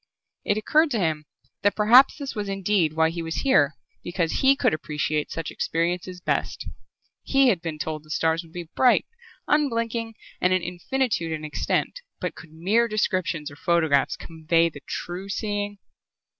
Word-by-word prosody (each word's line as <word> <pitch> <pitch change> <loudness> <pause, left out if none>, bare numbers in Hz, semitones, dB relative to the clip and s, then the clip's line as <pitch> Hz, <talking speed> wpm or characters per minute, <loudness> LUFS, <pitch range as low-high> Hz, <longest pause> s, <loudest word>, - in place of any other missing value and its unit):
It 205 - +1
occurred 305 +9 +3
to 245 - -1
him 155 -4 -1 0.4
that 205 - +2
perhaps 235 +5 +6
this 280 -2 -5
was 205 -3 -4
indeed 195 -4 +1
why 160 0 +2
he 170 0 -4
was 165 0 -3
here, 150 - +4 0.3
because 175 -2 -1
he 270 +1 +6
could - - +2
appreciate 150 -1 -2
such 165 -2 -5
experiences 180 +2 -2
best. - - -2 0.5
He 270 -1 +3
had 185 -8 +1
been 165 -3 -4
told 155 -1 -4
the 155 - -20
stars 160 +1 +1
would 165 -2 -17
be 175 -1 -7
bright, 250 -2 +4 0.4
unblinking, 230 -6 0 0.3
and 180 0 +3
an 185 -2 +1
infinitude 180 +1 -1
in 155 -1 -5
extent, 155 - -1 0.2
but - - -3
could 165 -2 -13
mere 200 +9 +2
descriptions 185 -8 -1
or - - -11
photographs 160 -3 +2
convey 165 +1 +1
the 145 -3 -12
true 180 +3 -5
seeing? 205 0 -3
175 Hz, 165 wpm, -25 LUFS, 160-215 Hz, 0.5 s, perhaps